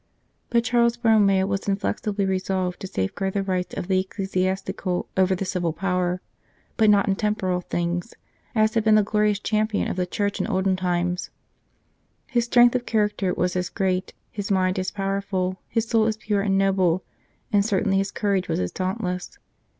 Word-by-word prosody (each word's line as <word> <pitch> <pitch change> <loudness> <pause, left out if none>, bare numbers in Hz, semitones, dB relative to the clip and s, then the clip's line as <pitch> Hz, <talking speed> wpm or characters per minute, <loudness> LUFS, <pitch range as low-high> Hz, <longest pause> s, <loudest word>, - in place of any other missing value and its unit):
But 235 -1 +2
Charles 235 0 +2
Borromeo 210 -5 +4
was 195 0 -1
as - - -14
inflexibly 200 0 -1
resolved 185 -1 -1
to 190 - -6
safeguard 185 - -2
the 200 - +1
rights 185 -2 -2
of - - -4
the 190 -1 +2
ecclesiastical 190 -1 -2
over 190 0 +3
the 195 - -3
civil 180 -3 -1
power 180 +1 -1 0.5
but 220 -2 +4
not 205 -1 +4
in 195 - +2
temporal 190 -4 -1
things 175 +4 -3 0.4
as 215 0 +3
had 225 -2 +1
been 215 0 +5
the 215 - +5
glorious 210 0 +1
Champion 215 +1 0
of - - -3
the 180 -1 0
Church 205 +2 -2
in - - -2
olden 190 0 +1
times. 180 0 -1 1.0
His 240 -2 0
strength 240 0 +5
of 250 -1 -2
character 210 -4 +1
was 180 - 0
as 180 0 -1
great, 185 -1 -1 0.2
his 205 -1 -5
mind 185 -1 +1
as 185 - -1
powerful, 195 -2 -2
his 225 0 -1
soul 225 -1 +3
as 220 -1 -1
pure 210 -2 -1
and 195 -1 +1
noble, 190 -2 +2 0.5
and 200 -1 +5
certainly 200 -1 +1
his 195 0 -1
courage 200 -3 0
was - - -1
as 90 -1 -2
dauntless. 185 -1 -3
195 Hz, 180 wpm, -24 LUFS, 185-210 Hz, 1.0 s, been